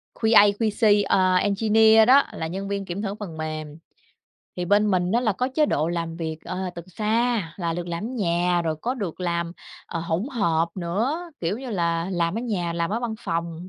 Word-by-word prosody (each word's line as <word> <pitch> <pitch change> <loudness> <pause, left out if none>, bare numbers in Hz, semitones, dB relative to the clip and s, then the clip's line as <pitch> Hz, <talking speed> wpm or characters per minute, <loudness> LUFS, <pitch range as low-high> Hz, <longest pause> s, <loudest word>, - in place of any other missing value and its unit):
QA, 220 -2 +6
QC, 210 -2 +3
ờ, 185 -1 +3
engineer 220 +3 +4
đó 275 +2 +7
là 160 - -4
nhân 190 +4 -5
viên 200 -1 -3
kiểm 180 +3 -4
thử 200 -1 -3
phần 190 -7 -8
mềm. 155 -1 -5 0.8
Thì 180 - -2
bên 205 +3 +3
mình 180 0 +1
á 235 - +3
là 225 -4 +1
có 250 +7 -1
chế 305 +1 +3
độ 155 - 0
làm 165 -1 -3
việc, 160 -2 -4
ờ, 185 0 -4
từ 170 - -7
xa 215 -1 0
là 170 -3 -2
được 175 0 -4
làm 170 +3 -4
ở - - -3
nhà 175 -7 0
rồi 160 -2 -1
có 250 +2 -1
được 195 -8 -5
làm, 170 -1 -1 0.3
ờ, 165 - -4
hỗn 170 +6 -2
hợp 170 -8 +1
nữa, 235 - -2
kiểu 180 +6 -1
như 260 -1 -7
là, 170 -2 -1
làm 170 +3 0
ở - - -2
nhà, 185 -8 -2
làm 170 +1 -1
ở 225 +3 -1
văn 235 -2 -3
phòng, 170 +1 -4
185 Hz, 210 wpm, -24 LUFS, 170-220 Hz, 0.8 s, đó